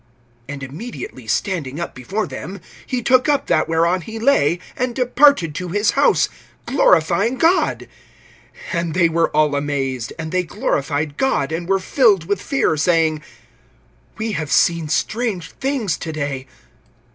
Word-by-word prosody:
(25)And 145 -1 -6
immediately 230 - -8
standing 160 -8 -2
up 170 - -4
before 190 - -3
them, 160 +8 -7 0.3
he 250 -2 -2
took 255 +4 +3
up 290 -1 +2
that - - +1
whereon 170 +3 +2
he 220 +7 -8
lay, 220 - +3 0.2
and 250 -1 -2
departed 250 - +4
to 180 +4 -4
his 205 +5 +1
house, - - +3 0.4
glorifying - - +3
God. 335 +6 +2 0.8
(26)And 170 -3 -1
they 175 -2 +4
were 165 0 +1
all 150 -1 +2
amazed; 135 -4 -2
and 160 -1 -5
they 185 0 +2
glorified 145 -2 -2
God, 265 - 0
and 170 +2 -4
were 195 - +4
filled 195 - +3
with 200 +1 -1
fear, 270 - +1
saying: 160 -1 +2 1.0
We 220 0 -2
have 155 -7 -3
seen 170 -3 +2
strange 210 -1 -1
things 255 - -2
to 160 - -5
day. 140 -4 -4
170 Hz, 145 wpm, -20 LUFS, 155-225 Hz, 1.0 s, departed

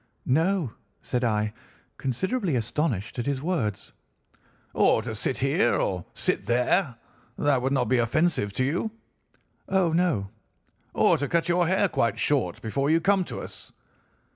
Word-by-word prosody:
"'No,' 160 - +1 0.3
said 125 0 -1
I, 105 -2 0 0.4
considerably 185 - -1
astonished 120 - -1
at 120 - -2
his 140 -1 -1
words. 135 - -2 0.8
"'Or - - +3
to - - -4
sit - - -1
here, - - +2
or 90 -2 -1
sit - - 0
there, 125 - +2 0.4
that 140 -3 +2
would 130 +2 0
not 130 -3 +2
be 125 +2 +2
offensive 120 -2 +1
to 130 - 0
you?' 170 +10 -1 0.8
"'Oh, 190 -4 +2
no.' 160 - +1 0.6
"'Or - - +4
to 145 - -1
cut 170 +4 +1
your 175 0 +3
hair 190 +3 +3
quite 115 - 0
short 125 -12 0
before 135 +6 -1
you 160 +1 +4
come 195 +2 +2
to - - -6
us? - - -10
140 Hz, 150 wpm, -26 LUFS, 115-175 Hz, 0.8 s, Or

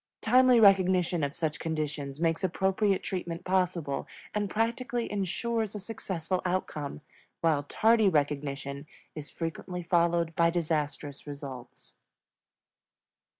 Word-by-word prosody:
Timely 250 +1 +5
recognition 185 -5 +4
of 140 +1 -2
such 160 -2 -2
conditions 150 -3 -3
makes 165 0 0
appropriate 190 +2 +1
treatment 175 -3 -4
possible 180 -6 0 0.3
and 205 -1 -1
practically 235 +3 -1
insures 210 +3 -1
a - - -3
successful 185 -4 -3
outcome; 155 -6 -3 0.4
while 160 -3 +3
tardy 220 +8 +3
recognition 140 -2 -2 0.3
is 150 -1 -7
frequently 180 +2 -5
followed 170 -1 +2
by 170 0 +4
disastrous 150 -4 -2
results. 135 -4 -9
170 Hz, 105 wpm, -29 LUFS, 150-195 Hz, 0.4 s, Timely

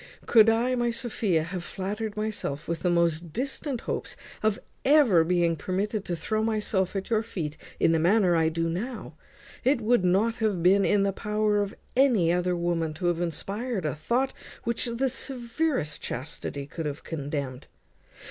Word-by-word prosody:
Could 225 -1 +6
I, 235 +3 +2
my 240 -1 +1
Sophia, 220 -8 0
have 175 +2 -5
flattered 210 +4 -4
myself 210 -8 -3
with 170 -1 -2
the 180 - 0
most 170 -1 +1
distant 265 - -3
hopes - - -3 0.3
of 215 -2 +2 0.3
being 285 - +5
ever 175 - +4
permitted 195 +5 -2
to 175 - -2
throw 215 +6 -1
myself 210 -4 0
at 195 +3 -4
your 220 -1 +3
feet 165 -9 -4 0.2
in - - +4
the 165 - +3
manner 180 +1 +4
I 160 -1 +3
do 165 +1 -1
now, 215 +9 -4 0.5
it 265 0 +3
would 235 -2 +2
not 205 +6 +2
have 205 -6 0
been 195 +2 +5
in 205 -1 +3
the 200 0 +1
power 210 0 +1
of 200 -1 -3 0.2
any 235 -11 +4
other 180 0 +1
woman 170 -2 -1
to 175 +3 -4
have 175 0 -1
inspired 200 +5 -2
a 150 - 0
thought 240 - 0 0.3
which 235 +1 -1
the 235 +3 0
severest 245 - -2
chastity 140 +1 -5
could 155 +2 -5
have 145 +1 -5
condemned. 140 -4 -4
195 Hz, 170 wpm, -27 LUFS, 165-225 Hz, 0.5 s, Could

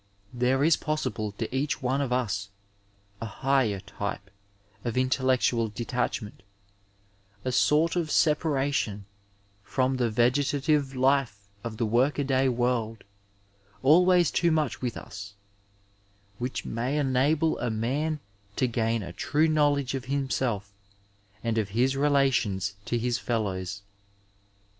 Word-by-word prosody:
There 125 +3 +2
is 160 +1 +5
possible 150 -9 -2
to. 115 +4 -4
each 140 0 -1
one 130 +3 +1
of 135 -3 -2
us 105 -5 -1 0.7
a 115 - -3
higher 130 -3 +1
type 100 0 -6 0.5
of 120 0 -3
intellectual 130 -2 +2
detachment, 115 -1 -3 1.0
a 130 - 0
sort 155 +7 +3
of 170 -3 -1
separation 140 - +1 0.6
from 130 +5 0
the 120 -2 +1
vegetative 140 +4 +1
life 130 -6 +1 0.2
of 115 -2 -5
the 115 - 0
work 120 +6 +2
a 145 - +1
day 135 -1 +2
world 120 -3 -1 0.4
— 100 +2 -33
^always 175 +4 +5
too 170 - +3
much 155 -4 0
with 125 -3 -3
us 100 0 -9 0.5
— 100 +1 -28
^which 125 +1 -3
may 125 +6 -2
enable 145 +3 +2
a 125 - -1
man 140 +8 -1 0.4
to - - +2
gain 115 -2 0
a 85 -1 -7
true 155 - +1
knowledge 145 -4 +2
of 130 -2 -4
himself 130 -7 -1 0.7
and 115 -1 0
of 105 -2 -2
his 130 +2 +3
relations 135 -9 +2
to 120 - 0
his 120 0 0
fellows. 100 -5 -2
125 Hz, 130 wpm, -27 LUFS, 110-140 Hz, 1.0 s, is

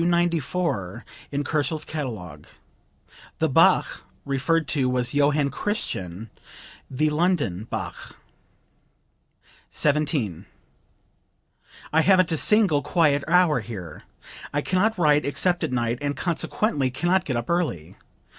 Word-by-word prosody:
294 170 - -1 0.3
in 145 0 -1
Kochel's 155 +1 -1
catalogue. 120 - -6 0.9
The - - +1
Bach - - +3 0.2
referred 140 +4 0
to 135 -4 +1
was 125 0 -1
Johann 145 0 +2
Christian, 110 - -4 0.6
the 150 +3 0
"London" 150 - 0
Bach.) - - -6 1.5
17. 145 - -1 1.5
"I 160 - +5
haven't 185 -1 +4
a 160 - +1
single 195 -6 +3
quiet 145 -5 +2
hour 170 -4 +4
here. 95 -8 -8 0.5
I 145 - 0
can 185 +4 0
not 220 +2 +2
write 150 -3 +3
except 175 +5 0
at - - -1
night 120 -1 -1
and 145 0 -2
consequently 165 - -1
can 130 +7 -3
not 185 +1 +3
get 130 -9 -2
up 120 - -4
early. 160 - -2
150 Hz, 115 wpm, -24 LUFS, 125-170 Hz, 1.5 s, I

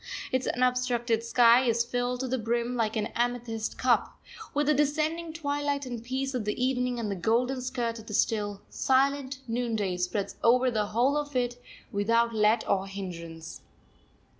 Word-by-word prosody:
Its 260 0 0
unobstructed 245 -2 +1
sky 235 +1 +6
is 235 -1 +2
filled 245 +1 -2
to 260 - -2
the 260 0 -1
brim, 235 +2 -1
like 225 -2 0
an 215 -1 -1
amethyst 240 -2 -2
cup, - - +1 0.3
with 295 +1 +1
the 300 - +4
descending 310 +3 0
twilight 285 -3 -2
and 240 -3 -6
peace 265 +2 -2
of 250 -3 -1
the 210 +2 -3
evening; 250 -1 0
and 215 -3 -2
the - - -1
golden 245 +7 +1
skirt 240 -3 -2
of 220 - -13
the 210 - -7
still, 205 -3 0
silent 270 0 +1
noonday 225 -5 -1
spreads 180 +3 -2
over 250 +2 +4
the 215 -3 0
whole 245 +7 +2
of 290 -2 -3
it 245 -1 -1 0.3
without 230 +3 +2
let 220 +1 +2
or 195 0 +1
hindrance. 170 -4 -7
240 Hz, 165 wpm, -28 LUFS, 220-260 Hz, 0.3 s, sky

